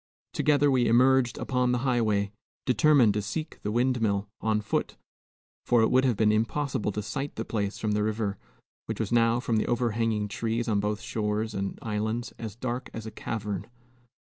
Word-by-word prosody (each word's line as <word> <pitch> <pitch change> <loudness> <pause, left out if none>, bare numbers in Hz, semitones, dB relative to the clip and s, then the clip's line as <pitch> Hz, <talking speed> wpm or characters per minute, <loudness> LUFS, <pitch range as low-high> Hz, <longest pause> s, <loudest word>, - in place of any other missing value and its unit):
Together 145 -1 +3
we 125 -2 +3
emerged 125 +1 +4
upon 125 -1 0
the 125 - +2
highway, 110 -5 +1 0.3
determined 130 -4 +5
to 105 - -1
seek 155 +10 -5
the 105 - -2
windmill 115 -4 +1
on 110 -1 +1
foot; 105 - -2 0.7
for 120 -2 +3
it - - +2
would 130 +1 +4
have 120 -5 +2
been 105 0 +4
impossible 115 +1 0
to 105 +1 -4
sight 135 +6 -4
the 115 - -4
place 100 -2 -2
from 110 - -1
the 105 0 +1
river, 105 -1 -1 0.5
which - - -4
was - - -2
now, 115 0 +3
from 115 -2 0
the 110 - 0
overhanging 115 -3 0
trees 115 +3 -2
on 105 -3 +2
both 105 +1 -1
shores 110 0 -2
and 100 -1 -3
islands, 110 +2 -2
as 110 -3 -6
dark 125 +1 -4
as 110 - -6
a 110 - -6
cavern. 105 -5 -4
115 Hz, 180 wpm, -27 LUFS, 105-125 Hz, 0.7 s, determined